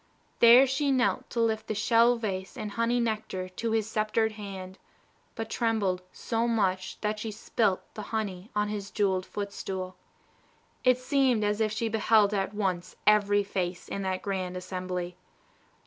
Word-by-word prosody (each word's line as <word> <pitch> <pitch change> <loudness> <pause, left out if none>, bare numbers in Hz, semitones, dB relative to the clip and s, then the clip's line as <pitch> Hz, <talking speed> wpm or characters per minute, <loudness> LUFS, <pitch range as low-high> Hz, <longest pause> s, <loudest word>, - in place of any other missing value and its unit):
There 240 +3 +9
she 275 +2 0
knelt 255 -2 +1
to 235 - -3
lift 220 -1 +1
the 215 - -2
shell 230 +3 +4
vase 195 -5 -4
and 210 -1 -4
honey 230 +3 +1
nectar 215 -5 -2
to 225 +5 -3
his 220 -1 +1
sceptered 220 0 +1
hand, 195 -3 -8 0.6
but 225 0 -4
trembled 220 -6 0
so 230 +1 -1
much 190 -5 0
that 210 0 -1
she 220 - -4
spilt 215 -2 0
the 215 - -6
honey 205 -3 -3
on 210 0 +1
his 205 -2 -4
jewelled 190 -3 0
footstool. 190 -2 -5 0.9
It 255 -1 +5
seemed 255 -3 +2
as 210 +1 0
if 215 -1 +2
she 225 +2 -1
beheld 215 -1 +3
at 195 -1 0
once 185 -4 -2
every 205 -1 +4
face 180 -3 -3
in 200 - -4
that 190 -1 -2
grand 185 -2 -2
assembly. 180 -1 -4
210 Hz, 160 wpm, -28 LUFS, 190-225 Hz, 0.9 s, There